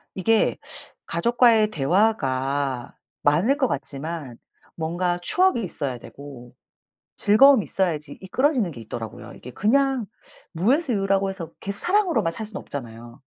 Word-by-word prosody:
이게 220 +4 +2 0.5
가족과의 225 +3 +3
대화가 140 - 0 0.3
많을 190 - +3
것 260 -4 +2
같지만 140 - -5 0.4
뭔가 175 +2 -1
추억이 360 - +2
있어야 140 -8 -4
되고 130 -4 -12 0.6
즐거움이 245 +3 +6
있어야지 165 -6 -2
이끌어지는 245 - +1
게 115 - -10
있더라고요. 110 -1 -8
이게 125 - -11
그냥 260 - +1 0.5
무에서 250 - +1
유라고 195 0 +1
해서 170 -4 -7
계속 200 0 -6
사랑으로만 345 - +1
살 220 - -6
순 210 -2 -10
없잖아요. 120 -6 -9
185 Hz, 310 characters per minute, -24 LUFS, 140-225 Hz, 0.6 s, 즐거움이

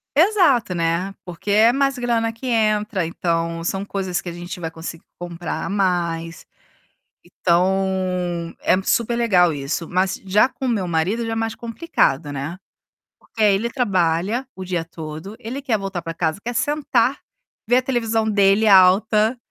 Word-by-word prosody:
Exato, 315 - +4
né. 170 +3 -1
Porque 180 +3 -5
é 220 +3 +6
mais 275 0 +1
grana 230 -2 0
que 230 +4 -8
entra, 215 -5 +1
então 165 0 -2
são 195 +3 -2
coisas 190 -2 -3
que 180 - -6
a - - -5
gente 175 +2 -7
vai 165 -1 -4
conseguir 165 0 -8 0.2
comprar 175 -1 -5
a - - -4
mais. 170 -4 -1 0.8
Então, 180 -1 0
é 185 - +2
super 235 +2 +1
legal 185 -8 +3
isso, 145 +3 -4
mas 185 +1 +1
já 200 +5 +4
com 265 - -6
o - - 0
meu 210 -6 0
marido 180 +8 0
já 225 - -3
é - - 0
mais 225 0 -2
complicado, 230 - -1
né. 145 +5 -5 0.6
Porque 220 - -4
aí 205 -2 +5
ele 225 +4 -1
trabalha 200 0 0
o 190 - -7
dia 175 -3 -2
todo, 160 +5 -8
ele 250 +6 -6
quer 240 -6 0
voltar 195 -3 -4
para 165 0 -5
casa, 160 +1 -1
quer 240 - -2
sentar, 270 -2 +1 0.5
ver 245 +2 +4
a - - +3
televisão 225 -4 0
dele 200 +1 +3
alta, 210 +4 +5
195 Hz, 165 wpm, -21 LUFS, 170-225 Hz, 0.8 s, é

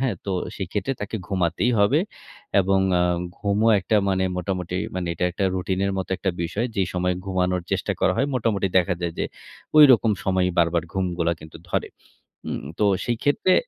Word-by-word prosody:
হ্যাঁ, 130 -6 +1
তো 100 - -2 0.2
সেক্ষেত্রে 100 +5 -2
তাকে 105 +2 -3
ঘুমাতেই 95 +4 0
হবে 115 +10 +4 0.6
এবং 95 +1 +2 0.2
আ - - +4 0.4
ঘুমও 105 +2 +1
একটা 105 +4 +1
মানে 95 -1 +1
মোটামুটি 90 -1 -3 0.2
মানে 90 -2 -2
এটা 90 - -1
একটা 95 +3 -2
রুটিনের 95 +1 -1
মতো 95 - -4
একটা 95 - -1
বিষয়। 105 +8 -1
যেই 95 -2 +1
সময় 90 0 0
ঘুমানোর 90 -2 0
চেষ্টা - - 0
করা - - +3
হয় 135 - +2
মোটামুটি 110 -5 0
দেখা 90 +1 +1
যায় 85 -1 -2
যে, - - 0 0.5
ঐরকম 130 -7 +7
সময়েই 95 -1 +1
বারবার 85 0 +3
ঘুমগুলা 90 -3 0
কিন্তু 80 +1 -11
ধরে। - - -1 0.6
উম - - -3 0.2
তো 105 - +3 0.2
সেই 120 -1 -1
ক্ষেত্রে 145 +6 +3
95 Hz, 170 wpm, -23 LUFS, 90-105 Hz, 0.6 s, ঐরকম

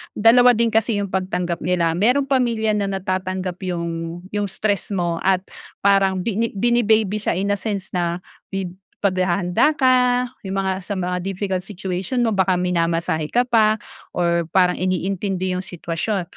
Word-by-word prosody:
dalawa 245 +2 +6
din 230 0 +2
kasi 225 0 +2
'yung 200 -2 -2
pagtanggap 180 -2 -2
nila. 170 -1 +1
Mayroong 235 +11 +2
pamilya 240 -5 +1
na 205 -2 0
natatanggap 185 -1 -3
'yung 170 -1 -4
'yung 205 -1 -1
stress 200 +1 -1
mo 170 -2 -1
at 185 -1 +3 0.4
parang 195 -2 +3
bini 225 +1 -1
bini-baby 220 -2 +2
siya 210 - -1
in 200 +3 0
a 200 - 0
sense 200 -3 -4
na 175 0 -2 0.2
bi 195 -1 -3 0.4
paghahanda 185 - +2
ka. 250 -2 +3 0.2
'Yong 190 - -3
mga 195 -1 0 0.2
sa 205 - -2
mga 180 -1 -2
difficult 190 0 -3
situation 195 +4 -2
mo 225 - +2
baka 190 -2 +2
minamasahe 165 -3 0
ka 245 +9 +2
pa 220 -3 +3 0.4
or 170 -1 +1
parang 180 -1 +3
iniintindi 185 0 -1
'yung 180 0 -2
sitwasyon, 175 +3 -3
190 Hz, 155 wpm, -21 LUFS, 180-215 Hz, 0.4 s, dalawa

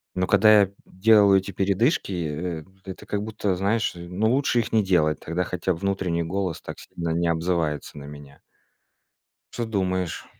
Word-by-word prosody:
Но 90 0 0
когда 105 +1 +6
я, 100 - +4
м, 95 - -21
делаю 100 0 +5
эти 95 +1 -7
передышки, 100 - +1
э, 85 -1 -3 0.2
это 95 - -9
как 105 0 -2
будто, 105 -3 -2
знаешь, 100 +3 0
ну 90 +6 -1
лучше 130 -2 +2
их 115 - -2
не 110 -2 +3
делать. 80 -6 +2
Тогда 85 +3 -2
хотя 90 +1 -2
б 80 - -8
внутренний 95 -3 -1
голос 90 0 -3
так - - -8
сильно 85 -1 -6
не 85 +1 0
обзывается 80 -3 -1
на 70 - -8
меня. 70 -1 -12 1.1
Что 120 - -3
думаешь? 95 -5 -2
95 Hz, 175 wpm, -24 LUFS, 85-100 Hz, 1.1 s, когда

